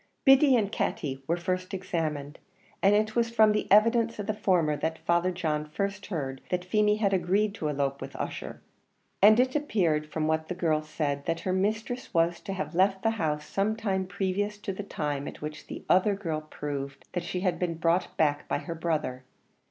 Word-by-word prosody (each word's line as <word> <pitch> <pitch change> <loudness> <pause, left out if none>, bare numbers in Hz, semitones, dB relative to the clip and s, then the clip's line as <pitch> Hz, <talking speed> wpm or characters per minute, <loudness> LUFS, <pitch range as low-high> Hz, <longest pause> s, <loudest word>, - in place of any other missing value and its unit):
Biddy 270 0 +7
and 210 -4 +1
Katty 135 -3 -2
were 170 - +1
first 185 +2 -2
examined, 155 -5 -3 0.4
and 200 +1 +5
it 215 +1 +1
was 235 -1 +2
from 220 -2 +5
the 210 -2 -1
evidence 230 +2 +4
of 205 - -4
the 215 - -1
former 180 -7 +2
that 160 +2 -2
Father 170 +2 +1
John 160 -4 -1
first 200 +6 -4
heard 135 -7 -4
that 180 0 -1
Feemy 210 +2 +3
had 200 -2 +1
agreed 195 +3 +1
to 160 -8 -3
elope 140 -1 -1
with - - -7
Ussher; - - -5 0.6
and 215 +3 +7
it 255 +2 +2
appeared 170 - +1
from 155 0 -1
what 160 0 0
the 180 - -4
girl 160 -4 +1
said 150 -2 -3
that 165 0 -1
her 185 - -1
mistress 215 +5 -2
was 165 +1 +2
to 195 - -5
have 190 -1 -4
left 190 +2 +2
the 225 - +3
house 150 -1 -1
some 200 +5 0
time 190 -4 -1
previous 200 +2 -2
to 205 -1 -4
the 190 - -5
time 145 -7 -3
at - - -8
which 150 0 -7
the - - -8
other 200 +2 +4
girl 165 -6 -3
proved 140 -1 -5
that 175 - -3
she 180 +1 -3
had 180 -3 0
been 175 -2 -1
brought 165 +2 0
back 145 -2 +1
by - - 0
her 170 +4 -5
brother. 155 -6 -2
180 Hz, 200 wpm, -28 LUFS, 155-205 Hz, 0.6 s, Biddy